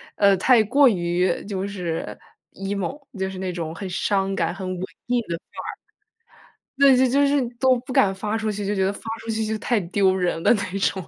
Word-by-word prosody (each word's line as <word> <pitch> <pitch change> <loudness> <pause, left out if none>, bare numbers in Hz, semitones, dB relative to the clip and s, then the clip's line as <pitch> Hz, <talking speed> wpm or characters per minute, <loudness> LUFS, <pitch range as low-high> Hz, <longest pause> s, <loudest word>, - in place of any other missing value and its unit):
呃， 200 -1 +5
太 230 +3 +5
过 270 +4 +5
于 175 -1 0
就 195 -1 -3
是 180 -5 -4 0.4
emo， 200 +9 -4
就 190 0 -1
是 190 - -8
那 185 -1 -3
种 165 -2 -5
很 195 +2 -6
伤 195 +1 0
感、 165 -1 0
很 190 -1 -6
文 185 0 -4 0.2
艺 245 -1 +1
的 170 -3 -4
范 - - -11
儿。 - - -6 1.0
对， 275 -2 +7
就 260 +1 +4
就 280 +3 +3
是 285 0 +2 0.2
都 260 0 +4
不 255 - -5
敢 195 -5 +3
发 210 +3 -2
出 220 -1 -1
去， 205 -1 -4
就 205 - 0
觉 190 -1 +1
得 195 - +1
发 - - -10 0.2
出 225 - -6
去 220 0 -1
就 220 0 -1
太 230 0 0
丢 190 +2 +2
人 180 -3 -1
了 - - +5
那 200 -3 -2
种， 190 -1 0
195 Hz, 245 characters per minute, -23 LUFS, 185-225 Hz, 1.0 s, 对